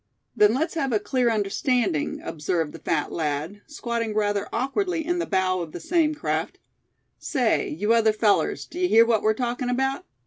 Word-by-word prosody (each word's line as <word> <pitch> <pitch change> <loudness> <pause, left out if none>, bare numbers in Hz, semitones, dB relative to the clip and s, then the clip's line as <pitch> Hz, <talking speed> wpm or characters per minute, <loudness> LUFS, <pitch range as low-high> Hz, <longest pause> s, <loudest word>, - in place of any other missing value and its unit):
"Then 210 +2 +4
let's 315 +5 -1
have 275 -5 -1
a 220 - +3
clear 240 +4 0
understanding," 215 - 0
observed 160 0 -2
the - - -9
fat 155 -3 -1
lad, 160 +5 -3
squatting 235 -7 -3
rather 205 -1 0
awkwardly 320 - -1
in 350 +1 0
the 345 - -2
bow 185 -1 +1
of 165 -2 -7
the - - -6
same 310 - +1
craft; 300 - -2 0.6
"say, 250 -6 0
you 210 +9 0
other 225 -1 +4
fellows, 215 -1 +1
d'ye 360 +1 -2
hear 230 -7 +6
what 230 -2 +2
we're 215 0 +2
talking 245 +1 -2
about?" 265 +2 -1
225 Hz, 175 wpm, -24 LUFS, 200-265 Hz, 0.6 s, hear